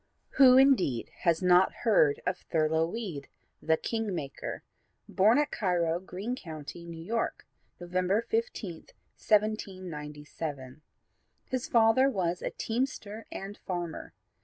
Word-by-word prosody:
Who 260 Hz, -2 st, +8 dB
indeed 250 Hz, -, +3 dB
has 170 Hz, +1 st, +3 dB
not 180 Hz, +1 st, +5 dB
heard 155 Hz, -10 st, +4 dB
of 180 Hz, 0 st, -1 dB
Thurlow 160 Hz, 0 st, +2 dB
Weed, 180 Hz, -10 st, -5 dB, 0.3 s
"The 160 Hz, +1 st, +2 dB
king 225 Hz, -2 st, -2 dB
maker," 140 Hz, -5 st, -5 dB, 0.4 s
born 215 Hz, +6 st, +4 dB
at 295 Hz, 0 st, +1 dB
Cairo, 175 Hz, -4 st, 0 dB
Greene 190 Hz, +6 st, -5 dB
County, 165 Hz, -, -9 dB
New 165 Hz, -1 st, -8 dB
York, 225 Hz, +6 st, -2 dB, 0.3 s
November 185 Hz, +4 st, 0 dB
15, 240 Hz, -, -3 dB, 0.3 s
1797. 155 Hz, -, -2 dB, 0.6 s
His 255 Hz, -2 st, -3 dB
father 235 Hz, +4 st, +4 dB
was 180 Hz, -6 st, -1 dB
a -, -, -2 dB
teamster 225 Hz, -3 st, -3 dB
and 195 Hz, +1 st, -7 dB
farmer. 175 Hz, -3 st, -5 dB
185 Hz, 115 wpm, -29 LUFS, 165-225 Hz, 0.6 s, Who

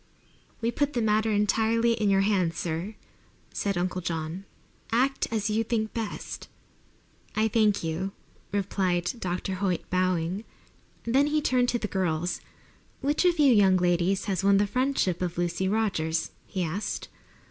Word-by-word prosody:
"We 230 Hz, +1 st, +1 dB
put 285 Hz, +3 st, 0 dB
the 240 Hz, -, 0 dB
matter 215 Hz, +1 st, +2 dB
entirely 225 Hz, +2 st, +2 dB
in 215 Hz, -3 st, +1 dB
your 195 Hz, 0 st, +4 dB
hands, 185 Hz, -5 st, +1 dB
sir," 175 Hz, +6 st, -3 dB, 0.6 s
said 200 Hz, -2 st, -1 dB
Uncle 180 Hz, +1 st, -1 dB
John. 165 Hz, +2 st, -4 dB, 0.5 s
"Act 260 Hz, +4 st, +2 dB
as 215 Hz, -1 st, -1 dB
you 220 Hz, +1 st, +2 dB
think 220 Hz, -1 st, -1 dB
best." 225 Hz, -3 st, -5 dB, 0.9 s
"I 220 Hz, +1 st, +3 dB
thank 215 Hz, -3 st, +2 dB
you," 165 Hz, +4 st, -2 dB, 0.4 s
replied 185 Hz, -3 st, 0 dB
Dr. 185 Hz, 0 st, -2 dB
Hoyt, 185 Hz, -3 st, 0 dB
bowing. 185 Hz, +1 st, 0 dB, 0.6 s
Then 265 Hz, +5 st, +3 dB
he 305 Hz, +1 st, +2 dB
turned 250 Hz, -4 st, +2 dB
to 240 Hz, -, +1 dB
the 220 Hz, -, -3 dB
girls. 175 Hz, -3 st, -1 dB, 0.6 s
"Which 290 Hz, +6 st, +1 dB
of 350 Hz, -1 st, +4 dB
you 285 Hz, -4 st, +6 dB
young 195 Hz, -3 st, +5 dB
ladies 180 Hz, +2 st, +1 dB
has 195 Hz, -2 st, -1 dB
won 200 Hz, 0 st, +5 dB
the 205 Hz, -, +3 dB
friendship 250 Hz, -6 st, 0 dB
of 175 Hz, -2 st, -2 dB
Lucy 175 Hz, +2 st, 0 dB
Rogers?" 190 Hz, -7 st, 0 dB, 0.2 s
he 185 Hz, -2 st, -2 dB
asked. 175 Hz, +6 st, -3 dB
200 Hz, 150 wpm, -27 LUFS, 180-225 Hz, 0.9 s, you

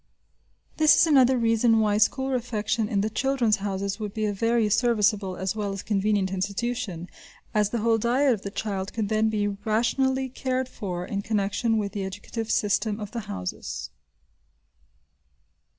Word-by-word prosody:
This 310 Hz, -1 st, +6 dB
is -, -, +5 dB
another 265 Hz, -5 st, +5 dB
reason 230 Hz, -1 st, +3 dB
why 210 Hz, -1 st, +2 dB
school 265 Hz, +5 st, +2 dB
refection 225 Hz, -3 st, -1 dB
in 200 Hz, -2 st, +1 dB
the 215 Hz, -, 0 dB
"Children's 255 Hz, -3 st, +1 dB
Houses" 200 Hz, 0 st, -3 dB
would 210 Hz, -2 st, -5 dB
be 215 Hz, -1 st, 0 dB
a 205 Hz, -, 0 dB
very 230 Hz, +2 st, +1 dB
serviceable 210 Hz, -4 st, +1 dB
as 190 Hz, +2 st, -2 dB
well 205 Hz, -2 st, -2 dB
as 195 Hz, -, -6 dB
convenient 205 Hz, -2 st, +1 dB
institution, 200 Hz, -1 st, -3 dB, 0.5 s
as 210 Hz, -1 st, +2 dB
the 235 Hz, 0 st, -2 dB
whole 225 Hz, 0 st, +2 dB
diet 250 Hz, +4 st, +3 dB
of 210 Hz, -, -4 dB
the 200 Hz, -, -5 dB
child 195 Hz, -2 st, -4 dB
could 215 Hz, -3 st, -2 dB
then 220 Hz, 0 st, +2 dB
be 210 Hz, -1 st, 0 dB
rationally 240 Hz, +6 st, 0 dB
cared 260 Hz, 0 st, -2 dB
for 180 Hz, -7 st, -5 dB
in 200 Hz, +1 st, -3 dB
connection 215 Hz, +2 st, 0 dB
with 205 Hz, -2 st, -2 dB
the 200 Hz, -, -4 dB
educative 205 Hz, +4 st, -5 dB
system 210 Hz, 0 st, +1 dB
of 210 Hz, -1 st, -6 dB
the 230 Hz, -2 st, -6 dB
Houses. 90 Hz, -2 st, -5 dB
215 Hz, 165 wpm, -26 LUFS, 200-235 Hz, 0.5 s, This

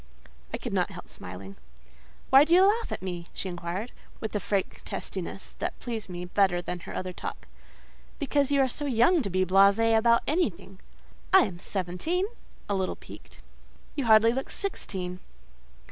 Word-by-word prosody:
I -, -, -2 dB
could -, -, -5 dB
not -, -, +1 dB
help -, -, -10 dB
smiling. 95 Hz, +2 st, -9 dB, 0.7 s
"Why 270 Hz, +2 st, +9 dB
do 330 Hz, +3 st, +4 dB
you 375 Hz, +1 st, +7 dB
laugh 450 Hz, +3 st, +2 dB
at -, -, -4 dB
me?" 175 Hz, -2 st, -4 dB
she 190 Hz, -, -3 dB
inquired, 175 Hz, +6 st, -4 dB, 0.3 s
with 220 Hz, -1 st, -5 dB
a -, -, +2 dB
frank 195 Hz, 0 st, -2 dB
testiness -, -, -6 dB
that -, -, -3 dB
pleased 225 Hz, -5 st, -5 dB
me 175 Hz, 0 st, -5 dB
better 185 Hz, -1 st, +2 dB
than 175 Hz, 0 st, -4 dB
her -, -, -8 dB
other 185 Hz, 0 st, -3 dB
talk. -, -, -7 dB, 0.7 s
"Because 285 Hz, -1 st, +1 dB
you 280 Hz, -1 st, +4 dB
are 265 Hz, -, +4 dB
so 290 Hz, +3 st, -4 dB
young 275 Hz, +7 st, +4 dB
to 200 Hz, -, -2 dB
be 185 Hz, 0 st, +1 dB
blasée 200 Hz, +5 st, +5 dB
about 235 Hz, +1 st, +4 dB
anything." 195 Hz, -, -1 dB, 0.5 s
"I 380 Hz, -, +8 dB
am 175 Hz, -4 st, -2 dB
seventeen" 195 Hz, -, -1 dB, 0.4 s
(a 205 Hz, -, 0 dB
little 190 Hz, -1 st, -1 dB
piqued). -, -, -14 dB, 0.5 s
"You 280 Hz, -4 st, -1 dB
hardly 220 Hz, +1 st, +6 dB
look 265 Hz, +2 st, -3 dB
sixteen. 185 Hz, -, -4 dB
205 Hz, 170 wpm, -28 LUFS, 180-270 Hz, 0.7 s, Why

